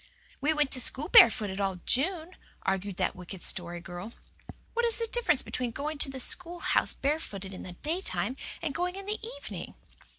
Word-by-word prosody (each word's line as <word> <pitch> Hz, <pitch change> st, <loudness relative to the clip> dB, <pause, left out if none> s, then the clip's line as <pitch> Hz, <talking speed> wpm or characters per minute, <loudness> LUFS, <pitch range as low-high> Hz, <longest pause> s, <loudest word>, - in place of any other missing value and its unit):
"We 295 Hz, +3 st, +2 dB
went 300 Hz, -3 st, +1 dB
to 255 Hz, -, +6 dB
school 270 Hz, +5 st, -3 dB
barefooted 205 Hz, -4 st, +6 dB
all 195 Hz, -1 st, 0 dB
June," 335 Hz, +5 st, 0 dB, 0.3 s
argued 195 Hz, 0 st, -2 dB
that -, -, 0 dB
wicked 180 Hz, 0 st, -9 dB
Story 175 Hz, -1 st, +4 dB
Girl. 175 Hz, +6 st, -8 dB, 0.6 s
"What 475 Hz, -, 0 dB
is 465 Hz, -2 st, +2 dB
the 460 Hz, -, 0 dB
difference 455 Hz, -, +1 dB
between 250 Hz, -1 st, -3 dB
going 290 Hz, +5 st, -5 dB
to 275 Hz, -, +5 dB
the 265 Hz, -1 st, -6 dB
schoolhouse 350 Hz, +6 st, +2 dB
barefooted 210 Hz, -10 st, -3 dB
in 185 Hz, -, -8 dB
the 180 Hz, -, -8 dB
daytime 310 Hz, -, 0 dB, 0.3 s
and 305 Hz, -4 st, -2 dB
going 360 Hz, +3 st, -2 dB
in 390 Hz, 0 st, -8 dB
the 425 Hz, +2 st, -4 dB
evening?" -, -, -8 dB
270 Hz, 175 wpm, -29 LUFS, -, 0.6 s, to